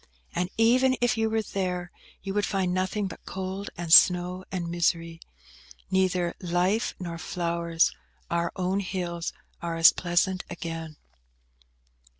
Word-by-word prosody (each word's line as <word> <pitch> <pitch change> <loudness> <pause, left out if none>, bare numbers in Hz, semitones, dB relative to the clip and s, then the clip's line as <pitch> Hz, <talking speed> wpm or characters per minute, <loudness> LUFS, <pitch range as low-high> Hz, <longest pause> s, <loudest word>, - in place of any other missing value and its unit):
And 180 +1 -1
even 255 +3 +4
if 245 -2 +2
you 225 -1 +1
were 220 0 0
there, 180 -3 -3 0.3
you 195 -1 -4
would 205 0 +1
find 190 -3 0
nothing 190 +3 -1
but 190 - -7
cold 190 +1 -5
and 170 -1 0
snow 180 +1 +6
and 180 -2 -3
misery; 165 -1 -1 0.7
neither 185 -2 +1
life 180 +5 0
nor 170 -2 -5
flowers; 170 -1 0 0.3
our 170 0 -1
own 185 +1 0
hills 175 -3 -3 0.3
are 170 -1 -3
as 165 - +8
pleasant 180 +1 0
again." 165 -2 -6
180 Hz, 135 wpm, -27 LUFS, 170-190 Hz, 0.7 s, as